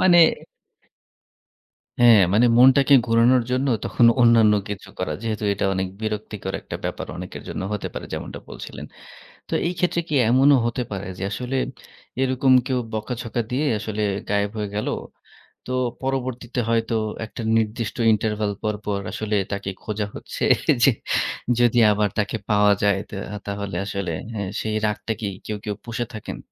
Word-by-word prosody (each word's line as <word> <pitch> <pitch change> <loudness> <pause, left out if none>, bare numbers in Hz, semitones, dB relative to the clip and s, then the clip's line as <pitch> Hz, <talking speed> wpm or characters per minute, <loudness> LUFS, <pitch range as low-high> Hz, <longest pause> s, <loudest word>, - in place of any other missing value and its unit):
মানে 175 -2 +6 1.8
হ্যাঁ, 120 -3 +7
মানে 115 +4 +5
মনটাকে 135 +2 +6
ঘোরানোর 115 +2 +4
জন্য 130 +2 +1 0.2
তখন 120 - +3 0.2
অন্যান্য 115 -3 +6 0.2
কিছু 100 - -6
করা। - - -1
যেহেতু 110 -2 -3
এটা 100 - -1
অনেক 95 0 -1
বিরক্তিকর 105 -3 -4
একটা - - -7
ব্যাপার - - -4
অনেকের - - -7
জন্য - - -4
হতে 105 - -3
পারে - - -6
যেমনটা - - -5
বলছিলেন। - - -8 0.6
তো - - -4
এই 180 - -1
ক্ষেত্রে 175 -1 +1
কি 150 - 0
এমনও 135 +3 +6
হতে 125 +1 -2
পারে 100 -1 -4
যে - - -3
আসলে 125 +4 -3 0.7
এরকম 130 0 +3
কেউ 130 -1 0
বকাঝকা 115 +2 -3
দিয়ে 140 +5 0
আসলে 110 0 -4 0.3
গায়েব 100 0 +1
হয়ে 105 -1 -2
গেল। 105 - -2 0.8
তো 130 - -6 0.3
পরবর্তীতে 130 -2 -2
হয়তো 115 0 +1 0.3
একটা 115 - -8 0.2
নির্দিষ্ট 110 +1 -2 0.2
ইন্টারভাল 105 -1 -1
পরপর 105 -1 -2
আসলে 110 -1 -2 0.2
তাকে 100 -1 -3
খোঁজা 105 -1 -2
হচ্ছে - - -6 0.4
যে - - +6 0.7
যদি 120 0 +4
আবার 105 0 +1
তাকে 105 +2 -1
পাওয়া 105 -1 +5
যায় 100 -1 +3
তো - - -8 0.3
তাহলে 100 -1 -4
আসলে 100 -3 -3 0.2
হ্যাঁ, 100 -3 -3
সেই 110 -1 -2
রাগটা 105 +1 -2
কি 105 - -1 0.2
কেউ, 105 - -3
কেউ 105 - -2
পুষে 120 +1 -3
থাকেন? 110 - -6
110 Hz, 150 wpm, -23 LUFS, 105-125 Hz, 1.8 s, হ্যাঁ